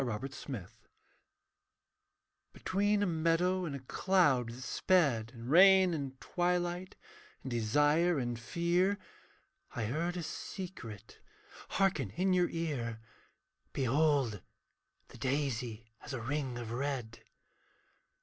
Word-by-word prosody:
GOOD 125 +2 -4
NEWS 110 -3 -7 1.7
Between 205 +2 +1
a - - +3
meadow 175 +2 +1
and 145 -4 -4
a - - -5
cloud 135 -5 +2
that 120 +2 -8
sped 135 -11 +2
In 115 0 -8
rain 185 +3 +7
and 135 -4 -4
twilight, 175 +1 -1 0.5
in 130 - -5
desire 145 +9 +3
and 120 -3 -2
fear. 175 - +1 0.8
I 110 - -1
heard 165 +10 -2
a 175 - -3
secret 125 - -7 0.5
hearken 170 - +1
in 185 +1 +2
your 180 -1 +3
ear, 135 -9 -3 0.7
'Behold 135 - +2 0.7
the - - -13
daisy 125 -5 -2
has - - -8
a 130 - -3
ring 135 -1 -2
of 115 -2 -6
red.' 125 -3 -3
145 Hz, 110 wpm, -33 LUFS, 120-175 Hz, 1.7 s, rain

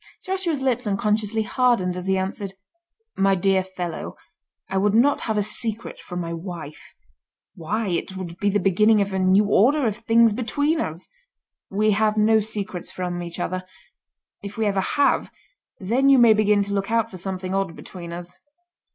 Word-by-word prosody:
Joshua's 370 -7 -2
lips 250 -3 0
unconsciously 210 +2 0
hardened 215 -6 +1
as 180 +1 -6
he 190 0 +2
answered: 190 +1 -4 0.6
"My 195 0 +3
dear 190 +1 +2
fellow, 180 -3 -6 0.5
I 190 +1 -2
would 205 +1 +2
not 270 +5 +3
have 220 -2 -2
a 205 - +2
secret 220 +1 -1
from 180 -1 -6
my 170 0 -4
wife. 165 -3 -8 0.6
Why, 200 +4 -3
it 185 +2 -3
would 175 -2 -7
be 205 - +1
the 205 +1 +1
beginning 210 +3 +4
of 200 -1 -1
a 190 - 0
new 190 +3 +4
order 255 +8 +3
of 215 -2 -1
things 230 -1 +4
between 285 +7 0
us. 160 +3 -5 0.6
We 215 +2 +2
have 215 +1 +1
no 220 +1 +4
secrets 210 -4 -5
from 180 -1 -4
each 170 0 -6
other. 185 +1 -3 0.8
If 200 +1 -8
we 220 - 0
ever 200 -2 +1
have, 285 +8 +1 0.5
then 245 +8 +2
you 275 - +7
may 235 -3 +7
begin 210 -1 +3
to 200 0 -4
look 195 0 -1
out 230 0 +1
for 185 - -8
something 185 0 -4
odd 195 -4 -1
between 170 -2 -9
us." 175 +1 -8
200 Hz, 175 wpm, -23 LUFS, 185-220 Hz, 0.8 s, you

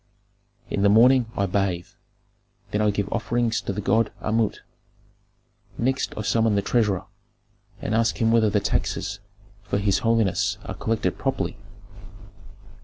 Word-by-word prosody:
"In 100 - -1
the 100 - +5
morning 120 +3 +5
I 100 - +2
bathe, 95 -3 -1 0.8
then 105 - 0
I 105 - +3
give 100 -1 -1
offerings 120 -1 0
to - - -3
the 100 +2 -4
god 110 +2 +2
Amut; 110 -1 0 1.2
next 130 +3 -1
I 110 - -3
summon 110 +1 +2
the 100 - +1
treasurer, 105 -5 +1 0.8
and - - -2
ask 115 0 +1
him 115 -1 +3
whether 115 -2 +4
the 105 0 +2
taxes 100 0 -2 0.4
for 100 0 -2
his 100 -1 +1
holiness 115 -4 +1
are - - -5
collected 110 -5 -2
properly. - - -2
105 Hz, 140 wpm, -24 LUFS, 100-115 Hz, 1.2 s, the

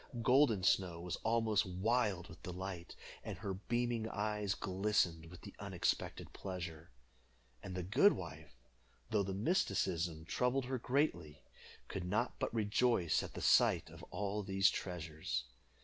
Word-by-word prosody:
Golden 125 -6 +4
Snow 90 -3 +2
was 90 0 -4
almost 110 -2 +2
wild 95 -1 0
with 85 - -13
delight, 90 -1 -6 0.3
and - - -5
her 95 - -3
beaming 120 +3 -1
eyes 105 -2 -1
glistened 95 -4 0
with 90 +1 -12
the - - -10
unexpected - - -2
pleasure. 85 -4 -6 0.7
And 95 - -6
the 90 - -2
good 130 - +5
wife, 75 -2 -8 0.6
though 105 - +3
the 95 -1 -2
mysticism 85 - 0
troubled 125 +7 +1
her 130 0 -2
greatly, 85 - 0 0.4
could 95 - -4
not 105 +7 -1
but - - -1
rejoice 110 -4 +2
at - - -8
the - - -5
sight - - +4
of - - -11
all 105 +1 -2
these 95 0 +3
treasures. 80 -9 -3
95 Hz, 140 wpm, -36 LUFS, 85-110 Hz, 0.7 s, good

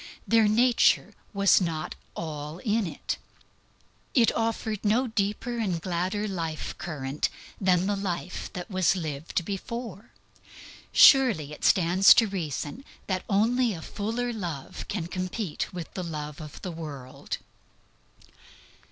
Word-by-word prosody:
Their 225 -2 +5
nature 235 +3 +4 0.2
was 200 -2 +4
not 160 -3 -2 0.2
all 150 -1 -5
in 210 +1 0
it. - - -4 1.0
It 235 -4 +4
offered 225 -2 -1
no 225 +5 +3
deeper 220 +1 -1
and 190 -7 0
gladder 185 +5 -1
life 165 -5 -4
current 145 -3 -2 0.3
than 185 -2 +3
the 205 +1 +1
life 185 -2 -4
that 180 +4 -6
was 185 -1 +3
lived 160 0 -3
before. 210 +2 -5 0.8
Surely 230 - +6
it - - -11
stands 185 +2 +6
to 230 - +5
reason 185 - -4 0.2
that 185 -2 -2
only 230 +3 +3
a 165 - -8
fuller 235 +4 -2
love 170 -10 -5
can 195 -5 -3
compete 185 +1 -3
with 175 -3 -7
the 185 - -4
love 150 -1 -5
of 150 -2 -9
the 185 - -3
world. 145 -6 -6
185 Hz, 125 wpm, -27 LUFS, 165-215 Hz, 1.0 s, Surely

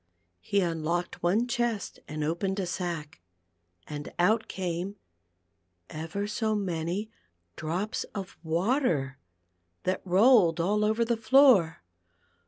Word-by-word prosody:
He 200 - 0
unlocked 170 0 -2
one 205 +8 +2
chest 235 -4 -2
and 150 0 -4
opened 190 +5 -1
a 190 - -1
sack, 170 - -4 0.6
and 145 -1 -7
out 215 +6 +2
came 185 +1 -3 1.0
ever 165 +6 -4
so 215 +1 -1
many 185 +2 -2 0.4
drops 180 +7 -2
of 195 -2 -6
water, 165 - 0 0.6
that 185 - -1
rolled 190 -2 +5
all 205 +5 +1
over 220 +2 +2
the 235 0 +1
floor. 225 - +5
185 Hz, 110 wpm, -28 LUFS, 165-215 Hz, 1.0 s, rolled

